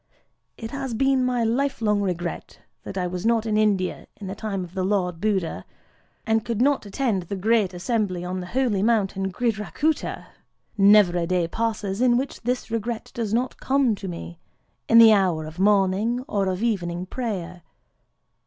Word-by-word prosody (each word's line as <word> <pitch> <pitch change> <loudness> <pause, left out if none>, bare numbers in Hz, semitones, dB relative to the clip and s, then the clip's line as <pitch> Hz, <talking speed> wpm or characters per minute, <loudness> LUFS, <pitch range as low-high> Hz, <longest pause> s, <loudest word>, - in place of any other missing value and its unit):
It 225 0 -7
has 270 -4 -4
been 270 +1 +2
my 250 -2 +1
life 260 +5 0
long 210 -2 +1
regret 175 -3 -4 0.2
that 195 - -7
I 180 - 0
was 180 0 -4
not 230 0 +2
in 215 -1 0
India 205 -4 0
in 205 - -10
the 190 - -4
time 200 -2 -4
of 175 0 -10
the 190 -1 -2
Lord 180 -3 -1
Buddha, 190 - -1 0.6
and 220 -1 +1
could 230 -3 -3
not 270 -3 +2
attend 210 -2 -1
the 180 +3 -5
great 210 0 +2
assembly 185 -1 -2
on 185 +1 -3
the 180 - -6
holy 235 -2 0
mountain 195 -3 +1
Gridhrakûta. 235 +8 -1 0.5
Never 200 -3 +5
a 170 - -1
day 180 -2 +1
passes 215 0 -2
in 245 -1 +4
which 265 +1 -4
this 245 0 -2
regret 230 0 -3
does 225 -4 -3
not 245 +3 -1
come 265 -3 +2
to 195 -1 -6
me, 170 -1 -7 0.5
in 230 - +6
the 225 -1 +9
hour 180 -6 +1
of 155 +3 -10
morning 205 +5 +2
or 200 -2 0
of 185 +3 -2
evening 180 -6 -1
prayer. 185 -6 -5
210 Hz, 175 wpm, -24 LUFS, 185-230 Hz, 0.6 s, the